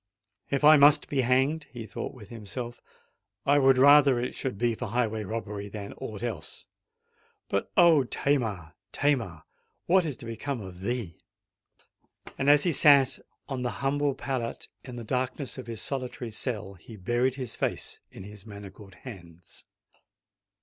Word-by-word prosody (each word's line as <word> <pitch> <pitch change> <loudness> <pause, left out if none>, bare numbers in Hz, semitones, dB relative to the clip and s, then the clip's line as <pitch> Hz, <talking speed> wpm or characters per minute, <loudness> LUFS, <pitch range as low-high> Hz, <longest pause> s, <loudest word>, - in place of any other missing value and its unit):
"If 140 +1 -1
I 155 +1 +9
must 145 +1 +6
be 140 -2 +1
hanged," 135 +5 +2
he 120 -5 -9
thought 110 - -6
within 115 -1 -10
himself, 120 +3 -6 0.6
"I 145 +1 +4
would 135 -1 +5
rather 140 -1 +7
it 120 +1 -2
should 130 -6 -3
be 120 +2 +1
for 125 +2 -5
highway 110 -1 -1
robbery 105 -1 -5
than 100 0 -7
aught 110 +1 -6
else!—But, 100 -1 -7
O 165 -6 +6
Tamar! 110 - -1 0.2
Tamar! 115 - 0 0.4
what 185 +1 +4
is 150 -6 -4
to - - -9
become 115 +4 -4
of 95 -3 -9
thee?" 110 -5 -4 1.1
And, 135 - +1
as 145 0 +6
he 175 - +2
sate 140 -3 +5 0.3
on 135 -3 -4
the 125 - -1 0.2
humble 145 0 +1
pallet 130 -4 -4
in 125 -1 -9
the 120 - -6
darkness 130 +3 -3
of 125 - -8
his 115 -2 -4
solitary 125 -3 -4
cell, 105 -3 -4
he 105 +4 -13
buried 120 +6 0
his 130 -4 -5
face - - -3
in - - -11
his 105 0 -11
manacled 100 -2 -11
hands. 90 -7 -12
120 Hz, 155 wpm, -28 LUFS, 105-135 Hz, 1.1 s, I